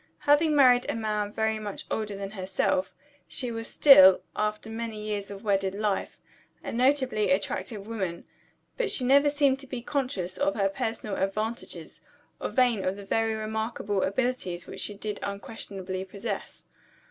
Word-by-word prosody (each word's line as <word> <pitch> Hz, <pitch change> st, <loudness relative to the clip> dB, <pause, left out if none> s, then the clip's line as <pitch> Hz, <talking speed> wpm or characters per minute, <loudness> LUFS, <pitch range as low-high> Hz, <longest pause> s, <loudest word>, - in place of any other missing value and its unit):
Having 300 Hz, +1 st, +4 dB
married 250 Hz, -3 st, +6 dB
a -, -, -1 dB
man 210 Hz, -2 st, -1 dB
very 220 Hz, 0 st, 0 dB
much 205 Hz, -2 st, -6 dB
older 210 Hz, -2 st, -2 dB
than 195 Hz, 0 st, -5 dB
herself, 220 Hz, +8 st, -1 dB, 0.4 s
she 250 Hz, -3 st, -3 dB
was 225 Hz, 0 st, -5 dB
still 190 Hz, -11 st, +8 dB
(after 210 Hz, +1 st, -2 dB
many 225 Hz, -1 st, -5 dB
years 210 Hz, -1 st, -4 dB
of 200 Hz, +1 st, -9 dB
wedded 195 Hz, -2 st, +1 dB
life) 205 Hz, -1 st, -1 dB, 0.5 s
a -, -, -4 dB
notably 255 Hz, -4 st, +2 dB
attractive 200 Hz, +2 st, -1 dB
woman. 190 Hz, -6 st, -4 dB, 0.5 s
But -, -, 0 dB
she 265 Hz, -, +1 dB
never 280 Hz, +3 st, +5 dB
seemed 285 Hz, -2 st, +2 dB
to 275 Hz, -, -11 dB
be 250 Hz, -2 st, -5 dB
conscious 250 Hz, -11 st, -2 dB
of 290 Hz, +1 st, +1 dB
her 195 Hz, -2 st, +2 dB
personal 215 Hz, 0 st, -3 dB
advantages, 215 Hz, +4 st, -3 dB, 0.4 s
or -, -, -3 dB
vain 245 Hz, -6 st, +2 dB
of 185 Hz, -, 0 dB
the 200 Hz, 0 st, -10 dB
very 225 Hz, +2 st, +1 dB
remarkable 220 Hz, -2 st, -2 dB
abilities 200 Hz, -5 st, -1 dB
which -, -, -8 dB
she 205 Hz, -, -4 dB
did 210 Hz, 0 st, -5 dB
unquestionably 195 Hz, -2 st, -5 dB
possess. 200 Hz, +2 st, -6 dB
215 Hz, 160 wpm, -27 LUFS, 200-250 Hz, 0.5 s, still